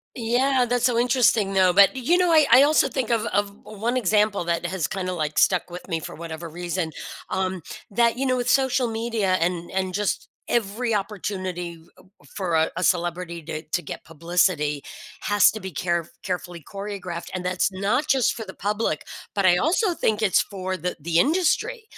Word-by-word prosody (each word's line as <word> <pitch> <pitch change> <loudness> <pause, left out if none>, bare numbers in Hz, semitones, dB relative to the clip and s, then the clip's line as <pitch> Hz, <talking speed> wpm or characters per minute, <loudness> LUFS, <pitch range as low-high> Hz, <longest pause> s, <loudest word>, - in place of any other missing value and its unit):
Yeah, 250 +2 +2
that's 245 0 0
so 245 -2 +3
interesting, 235 -5 +3
though, 185 -1 +4
but, 200 +6 +6
you 265 +8 +2
know, 360 -1 +3
I 310 -3 +6
I 255 +3 +9
also 305 +2 +4
think 255 -5 -2
of 230 -2 +1
of 205 0 0
one 225 +4 -3
example 210 -3 +2
that 170 0 -1
has 180 -2 -2
kinda, 185 -1 -3
like, 155 -3 -2
stuck 180 -1 +3
with 180 +2 -9
me 165 -3 -1
for - - -7
whatever 165 0 -7
reason, 175 0 -3 0.4
um, 185 -1 -2 0.3
that, 235 +3 +2
you 270 - 0
know, 255 -1 +2
with 245 0 -2
social 265 -2 +2
media 225 -4 -1
and 170 0 -1
and 190 -1 -2
just 205 0 -1 0.2
every 230 +1 0
opportunity 190 -4 -3
u 160 +1 -21 0.5
for 180 -4 0
a 160 0 +3
a 180 - -2
celebrity 175 -1 0
to 155 0 -5
to 175 - 0
get - - -8
publicity 165 -3 0 0.4
has 205 -1 +4
to 220 - -7
be 190 - -6
care 170 0 -2
carefully 180 -2 -4
choreographed, 195 -1 -6
and 185 -1 -4
that's 180 +2 +1
not 205 +10 0
just 265 -5 +3
for 225 - -6
the - - -9
public, 205 -6 -2 0.3
but 200 -2 +3
I 175 -1 +6
also 350 - +1
think 215 -8 0
it's 210 -5 +3
for 190 -2 -4
the 180 0 -4
the 165 +2 0
industry, 375 - +1
195 Hz, 190 wpm, -24 LUFS, 175-235 Hz, 0.5 s, I